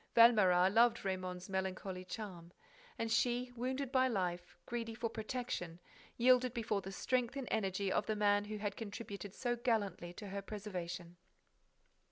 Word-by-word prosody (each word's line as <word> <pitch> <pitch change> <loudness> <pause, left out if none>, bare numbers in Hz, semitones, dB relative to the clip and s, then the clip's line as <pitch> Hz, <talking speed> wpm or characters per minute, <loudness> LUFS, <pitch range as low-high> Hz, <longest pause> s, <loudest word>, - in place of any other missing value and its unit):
Valméras 195 -6 +7
loved 230 -1 +4
Raymonde's 185 -1 -3
melancholy 190 -1 -3
charm; 185 -4 -7 0.5
and 230 0 -2
she, 245 +2 +2
wounded 260 +2 -2
by 260 -1 +4
life, 180 -6 -2
greedy 230 -1 -3
for 230 -1 -2
protection, 220 -7 -4 0.4
yielded 250 0 +5
before 215 -3 0
the 195 - -7
strength 250 +4 0
and 270 -3 -4
energy 195 -2 0
of 205 - +1
the 215 - 0
man 205 -1 +3
who 215 +1 -4
had 205 -1 -3
contributed 205 -2 -6
so 245 -1 0
gallantly 220 -7 -1
to 200 +3 -8
her 200 +1 -3
preservation. 180 -4 -6
210 Hz, 150 wpm, -36 LUFS, 190-235 Hz, 0.5 s, Valméras